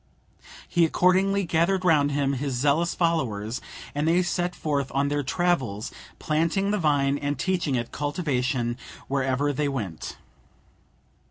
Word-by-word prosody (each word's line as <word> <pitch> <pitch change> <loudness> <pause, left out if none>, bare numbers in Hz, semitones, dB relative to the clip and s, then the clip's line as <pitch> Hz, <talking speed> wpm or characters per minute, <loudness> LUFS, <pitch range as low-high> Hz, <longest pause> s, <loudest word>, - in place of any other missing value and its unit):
He 175 - +2
accordingly 190 +4 +3
gathered 175 +3 +1
round 145 -4 +4
him 140 -1 +1
his 135 0 -2
zealous 145 +7 +2
followers, 125 - -1 0.3
and 145 +2 -1
they 175 +2 +4
set 175 0 -1
forth 140 -3 -1
on 140 +1 +2
their 145 0 0
travels, 135 - 0 0.3
planting 165 +6 0
the 210 - 0
vine 145 -3 +2
and 145 -1 -2
teaching 175 -4 0
its 120 -1 -2
cultivation 130 -6 -1 0.3
wherever 135 +1 0
they 145 +1 0
went. 105 - -5
145 Hz, 135 wpm, -25 LUFS, 135-170 Hz, 0.3 s, round